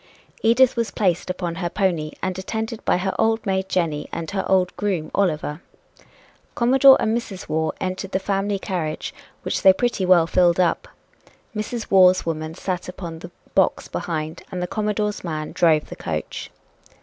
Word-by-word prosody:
Edith 235 +3 +4
was 230 -2 0
placed 180 -4 0
upon 180 -2 -3
her 175 - -1
pony 170 -6 0
and 185 0 -2
attended 220 +3 -4
by - - +3
her 190 +1 -1
old 225 +1 +2
maid 190 -1 -1
Jenny 160 -5 -1
and 165 -1 -5
her 190 -1 -1
old 185 -1 +2
groom 190 -7 -2
Oliver. 160 -4 0 0.9
Commodore 265 +3 +6
and 220 0 +1
Mrs. 210 -5 -5
Waugh 160 0 0
entered 185 +1 -4
the - - +1
family 195 +1 -1
carriage, 170 -5 -3 0.3
which - - -2
they 190 - +8
pretty 240 -2 -1
well 180 -3 +5
filled 175 0 +3
up. 185 - +1 0.7
Mrs. 220 +2 -4
Waugh's 185 -1 +6
woman 155 -1 -3
sat 180 -1 -4
upon 170 -3 -7
the 175 - -9 0.2
box 190 - +2
behind 160 -1 -4
and 185 - -4
the 180 - -1
Commodore's 210 +1 -2
man 155 -3 -4
drove 160 -3 +2
the - - -7
coach. - - -5
185 Hz, 165 wpm, -22 LUFS, 170-205 Hz, 0.9 s, they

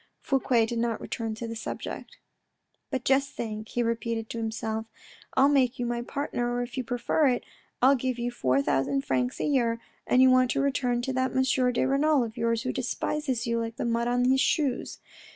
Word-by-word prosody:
Fouque 255 -4 +2
did 230 +1 -3
not 230 -1 0
return 225 -2 -4
to 230 +1 -5
the 230 - -5
subject. 220 - -6 0.4
" - - -49
But 255 -2 -3
just 270 +1 +2
think," 215 -1 -5
he 240 - 0
repeated 230 -1 -2
to 230 - -4
him, 225 -1 -1 0.6
" - - -22
I'll 270 +1 +6
make 265 -3 +3
you 245 - -2
my 240 0 -2
partner, 245 -2 -2
or 245 0 -1
if 240 0 -8
you 260 - -2
prefer 245 +5 +1
it, 245 -2 +1 0.4
I'll 265 +2 +7
give 255 -1 -1
you 240 0 -2
four 135 - +1
thousand 135 0 0
francs 125 -1 0
a - - 0
year, 235 -5 +1 0.3
and 250 - +4
you 260 0 +7
want 255 -1 +4
to - - 0
return 250 -3 0
to 265 +1 -2
that 260 0 0
M. 260 - +4 0.3
de 240 - +1
Renal 280 +1 +3
of 225 -1 -6
yours, 230 -1 0
who 255 - -2
despises 260 0 -2
you 235 -1 0
like 230 0 -4
the 260 - -3
mud 235 0 0
on 245 0 +2
his 265 +1 +4
shoes. 285 -5 0
245 Hz, 215 wpm, -27 LUFS, 230-260 Hz, 0.6 s, I'll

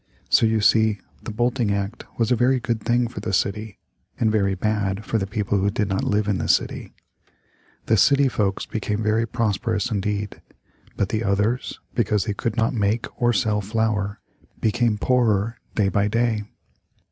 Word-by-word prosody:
So 115 - +5
you 110 -1 +1
see 110 0 +4 0.2
the - - -7
Bolting 120 0 0
Act 100 +2 -3
was 115 -1 +1
a - - +5
very 125 +3 +3
good 115 -2 -2
thing 120 +1 +1
for 115 - -7
the - - -3
city, 100 +2 -1 0.4
and 110 -2 +2
very 100 -3 +1
bad 105 0 -1
for 115 - 0
the 95 - -2
people 100 0 -1
who 100 +1 +2
did 105 0 -1
not 95 - 0
live 105 0 +1
in 100 -3 0
the - - -2
city. - - 0 0.9
The 110 - +3
city 140 +7 +5
folks 105 -6 -1
became 105 0 -3
very 110 +2 +1
prosperous 110 0 -1
indeed, 105 0 -2 0.6
but 100 - 0
the 110 0 -1
others, 105 +5 0
because 105 -3 +1
they 105 - -1
could 105 +2 -3
not 115 +4 +2
make 110 0 0 0.2
or 120 0 +4
sell 105 -1 +1
flour, 105 -1 -1 0.4
became 115 0 +1
poorer 115 -2 +1 0.2
day 105 -3 +2
by 100 +1 +1
day. 110 -1 0
110 Hz, 175 wpm, -23 LUFS, 100-115 Hz, 0.9 s, So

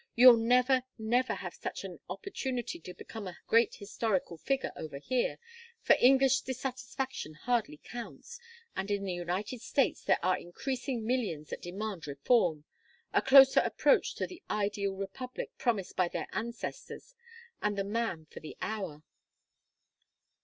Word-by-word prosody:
You'll 245 0 +9
never, 250 +3 +4 0.2
never 240 +3 +1
have - - -6
such - - -5
an - - -8
opportunity 260 - -4
to 180 +2 -9
become 215 +2 -8
a 180 - -8
great 230 0 +4
historical 200 -3 -2
figure 270 - -1
over 150 -3 -6
here, 245 - 0 0.5
for - - +6
English 265 +1 +5
dissatisfaction 260 - -4
hardly 235 -5 -1
counts, 245 - -8 0.4
and 195 +2 -3
in 200 -1 0
the 190 -2 -2
United 185 +7 -3
States 270 +2 +1
there - - +3
are 185 0 +3
increasing 245 +5 -4
millions 215 -12 -1
that - - -5
demand 190 -1 -5
reform, 155 - +2 0.5
a - - +4
closer 270 0 +8
approach - - +2
to - - -1
the 360 - -11
ideal 200 -1 -1
republic 200 +7 -6
promised 220 -7 0
by 185 - +3
their - - -3
ancestors, 235 - -5 0.5
and 210 -1 0
the 195 - +1
man 205 -6 -2
for - - -11
the 155 - -10
hour." 190 -9 -4
225 Hz, 145 wpm, -31 LUFS, 185-255 Hz, 0.5 s, You'll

